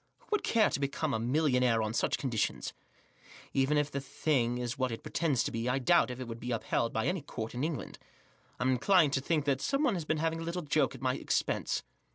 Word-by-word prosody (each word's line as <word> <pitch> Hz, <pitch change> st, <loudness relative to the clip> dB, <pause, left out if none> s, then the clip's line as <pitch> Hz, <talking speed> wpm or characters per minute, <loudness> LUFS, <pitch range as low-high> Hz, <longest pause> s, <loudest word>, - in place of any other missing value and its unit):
Who -, -, -28 dB
would 425 Hz, -, +2 dB
care 225 Hz, -2 st, +3 dB
to -, -, -1 dB
become 140 Hz, +2 st, -1 dB
even 110 Hz, -, 0 dB
a -, -, -2 dB
millionaire 125 Hz, -6 st, +3 dB
on 110 Hz, 0 st, -2 dB
such 115 Hz, -, +1 dB
conditions? 120 Hz, -6 st, -1 dB, 0.8 s
Even 135 Hz, +2 st, +2 dB
if 150 Hz, 0 st, +1 dB
the 140 Hz, -, -3 dB
thing 130 Hz, -3 st, 0 dB
is 120 Hz, -1 st, -3 dB
what 130 Hz, -1 st, -1 dB
it 115 Hz, -, -6 dB
pretends 150 Hz, -8 st, +1 dB
to -, -, -2 dB
be, 115 Hz, +2 st, -2 dB
I 125 Hz, -, +1 dB
doubt 170 Hz, +3 st, +4 dB
if 125 Hz, 0 st, -6 dB
it 130 Hz, -, -5 dB
would 115 Hz, 0 st, -6 dB
be 120 Hz, -, -6 dB
upheld 115 Hz, 0 st, 0 dB
by 110 Hz, -, -1 dB
any 180 Hz, -2 st, 0 dB
court 115 Hz, -5 st, -6 dB
in 125 Hz, +2 st, -3 dB
England. 155 Hz, -4 st, -4 dB, 0.6 s
I'm 130 Hz, +1 st, +2 dB
inclined 150 Hz, +3 st, +4 dB
to 135 Hz, -, +1 dB
think 150 Hz, +1 st, 0 dB
that 135 Hz, -2 st, +1 dB
someone 275 Hz, -3 st, +1 dB
has 170 Hz, -5 st, -3 dB
been 155 Hz, -, 0 dB
having 165 Hz, +1 st, 0 dB
a -, -, -4 dB
little 170 Hz, +2 st, -3 dB
joke 145 Hz, -2 st, +1 dB
at 130 Hz, -, -11 dB
my 130 Hz, -1 st, +2 dB
expense." -, -, -1 dB
135 Hz, 235 wpm, -31 LUFS, 125-155 Hz, 0.8 s, doubt